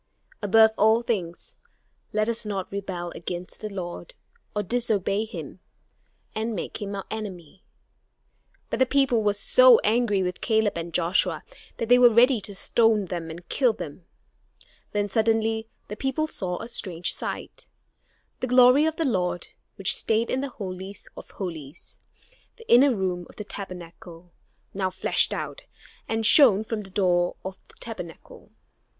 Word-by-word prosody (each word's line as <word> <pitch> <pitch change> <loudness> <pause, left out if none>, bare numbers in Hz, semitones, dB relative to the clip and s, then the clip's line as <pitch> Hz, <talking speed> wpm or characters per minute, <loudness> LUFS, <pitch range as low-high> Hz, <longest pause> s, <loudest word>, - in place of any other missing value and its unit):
Above 220 +2 +5
all 220 +3 +4
things, 210 - -4 0.5
let 215 0 0
us 235 0 0
not 200 -3 -4
rebel 185 -3 -5
against 175 +1 -7
the 215 - -4
Lord, 190 - -7 0.4
or 210 - 0
disobey 215 -2 0
him, 220 - -8 0.7
and 220 +1 -2
make 185 - -5
him 200 -1 -4
our 195 - -5
enemy." 195 -5 -7 1.1
But - - -2
the 260 - +4
people 270 -4 +2
were 205 -1 +1
so - - +7
angry 215 -3 +2
with 180 0 -4
Caleb 220 -2 +1
and 170 0 -5
Joshua 175 +2 +1 0.3
that 230 - -3
they 245 +1 +6
were 245 -1 +8
ready 240 +1 +5
to 200 0 -8
stone 225 0 +2
them 170 -2 -5
and 170 +2 -10
kill 250 +2 +2
them. 165 -2 -9 0.9
Then 205 0 0
suddenly 220 +1 +1 0.2
the 210 - -6
people 270 +6 -1
saw 185 - -3
a - - -6
strange 180 -7 -1
sight. - - -6 0.7
The 255 - -2
glory 250 +4 +6
of 320 - -1
the 325 - -1
Lord, 180 -8 -1 0.3
which 195 - +3
stayed 225 +1 +1
in 260 - 0
the 280 - -3
Holy 190 -3 -7 0.2
of - - -11
Holies, 165 -5 -8 0.6
the 455 - -16
inner 255 +1 +6
room 180 -3 -2
of - - -16
the 210 - -6
Tabernacle, 175 -3 -10 0.4
now 190 -1 -1
flashed 185 0 +1
out, - - -5 0.4
and 225 0 -1
shone 220 -5 +7
from 220 -1 -4
the 195 - -10
door 180 -2 +1
of 190 0 -6
the - - -19
Tabernacle. 180 -8 -9
210 Hz, 155 wpm, -25 LUFS, 180-230 Hz, 1.1 s, were